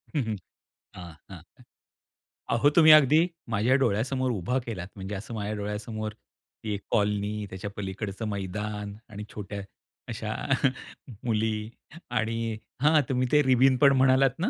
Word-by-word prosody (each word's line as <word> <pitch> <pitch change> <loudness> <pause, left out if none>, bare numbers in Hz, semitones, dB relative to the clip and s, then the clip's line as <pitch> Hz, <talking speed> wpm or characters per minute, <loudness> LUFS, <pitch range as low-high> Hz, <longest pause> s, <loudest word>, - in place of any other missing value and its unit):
हं, 145 - +2
हं. 110 -1 -2 0.6
हां, 90 -2 -9 0.2
हां. - - -10 1.1
अहो 130 +5 +4
तुम्ही 160 -2 +8
अगदी 150 +1 +5 0.3
माझ्या 115 +4 +3
डोळ्यासमोर 125 +4 0
उभा 110 +4 -1
केलात. 95 -7 -5
म्हणजे, 100 +1 -5
असं 105 +4 -7
माझ्या 105 0 -3
डोळ्यासमोर 105 +1 -4 0.5
ती 110 -1 -2
एक 100 - -7
कॉलनी, 105 0 0
त्याच्या 95 +2 -6
पलीकडचं 100 +2 -4
मैदान 105 +1 -4
आणि 105 -1 -7
छोट्या 100 -1 -6 0.5
अशा 110 -1 -4 0.9
मुली 110 -1 0 0.4
आणि 115 -1 -1 0.2
हां. 150 +1 +5
तुम्ही 130 -1 +1
ते 150 - +6
रिबीन 130 0 +4
पण 140 +1 +6
म्हणालात 130 +1 +4
ना? 180 - +1
110 Hz, 135 wpm, -27 LUFS, 105-125 Hz, 1.1 s, तुम्ही